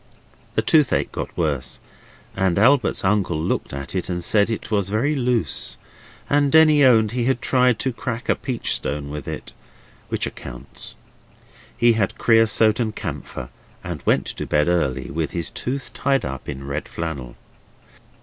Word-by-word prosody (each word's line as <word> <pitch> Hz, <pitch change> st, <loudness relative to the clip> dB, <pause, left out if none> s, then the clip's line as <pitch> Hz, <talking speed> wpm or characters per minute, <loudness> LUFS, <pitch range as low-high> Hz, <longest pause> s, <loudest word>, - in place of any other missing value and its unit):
The -, -, +2 dB
toothache 150 Hz, -5 st, +3 dB
got -, -, -6 dB
worse, 70 Hz, -6 st, -1 dB, 0.6 s
and 95 Hz, -2 st, +1 dB
Albert's 125 Hz, -1 st, +3 dB
uncle 95 Hz, -5 st, +1 dB
looked 80 Hz, -, -2 dB
at 70 Hz, 0 st, -6 dB
it, 95 Hz, -1 st, -2 dB
and 90 Hz, -1 st, -2 dB
said 105 Hz, +3 st, +3 dB
it 115 Hz, 0 st, -4 dB
was 100 Hz, -2 st, +1 dB
very 120 Hz, +9 st, +1 dB
loose, 120 Hz, -, -1 dB, 0.5 s
and 145 Hz, -1 st, +2 dB
Denny 155 Hz, -2 st, +6 dB
owned 110 Hz, -5 st, +5 dB
he 120 Hz, 0 st, -1 dB
had 130 Hz, -1 st, +1 dB
tried 125 Hz, -3 st, +3 dB
to 130 Hz, +2 st, -1 dB
crack 120 Hz, 0 st, -5 dB
a -, -, +3 dB
peach 125 Hz, -3 st, -2 dB
stone 70 Hz, 0 st, -3 dB
with 75 Hz, -2 st, -6 dB
it. -, -, -6 dB, 0.6 s
Which -, -, -1 dB
accounts. -, -, -7 dB, 0.8 s
He 120 Hz, 0 st, +5 dB
had 110 Hz, -3 st, 0 dB
creosote 115 Hz, -1 st, +4 dB
and 110 Hz, -3 st, -1 dB
camphor, 70 Hz, -7 st, -6 dB, 0.3 s
and -, -, -5 dB
went -, -, +2 dB
to -, -, -5 dB
bed 75 Hz, +1 st, +2 dB
early, 65 Hz, -7 st, 0 dB
with 80 Hz, +2 st, -1 dB
his 85 Hz, -3 st, -2 dB
tooth 125 Hz, -2 st, -4 dB
tied 135 Hz, +3 st, +1 dB
up 65 Hz, -1 st, -6 dB
in 70 Hz, -1 st, -6 dB
red 70 Hz, +2 st, -4 dB
flannel. 70 Hz, -8 st, -5 dB
105 Hz, 160 wpm, -22 LUFS, 75-125 Hz, 0.8 s, Denny